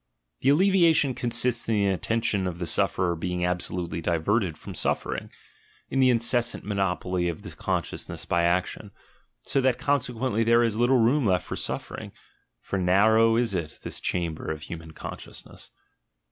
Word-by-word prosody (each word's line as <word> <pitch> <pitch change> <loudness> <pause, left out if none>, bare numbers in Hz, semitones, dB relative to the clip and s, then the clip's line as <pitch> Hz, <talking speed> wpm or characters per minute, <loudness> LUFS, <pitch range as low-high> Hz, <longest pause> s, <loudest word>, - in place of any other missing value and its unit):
The 135 - +2
alleviation 165 -4 +4
consists 120 -1 +1
in 110 - +2
the 100 -1 +2
attention 100 0 0
of 85 -2 -4
the 85 - -3
sufferer 85 +2 +1
being 90 +1 -2
absolutely 90 -1 -2
diverted 85 +2 0
from - - -9
suffering, - - -2 0.6
in 135 - 0
the 130 -1 +5
incessant 120 0 +1
monopoly 95 -3 -1
of 85 - -6
the - - -7
consciousness - - -4
by 85 - +1
action, 90 +4 0 0.5
so 135 - +1
that 130 -2 +2
consequently 125 -4 0
there 115 +1 +4
is 115 -3 0
little 120 +3 +3
room 120 +2 +3
left 90 -3 +1
for - - -5
suffering - - -5 0.3
— - - -47
for 100 - -2
narrow 110 +5 +4
is 115 -3 +1
it, 85 -4 -4
this - - -4
chamber 85 -3 -3
of 80 -1 -4
human 80 +1 -8
con 80 - -7
sciousness! - - -10
105 Hz, 160 wpm, -26 LUFS, 90-120 Hz, 0.6 s, the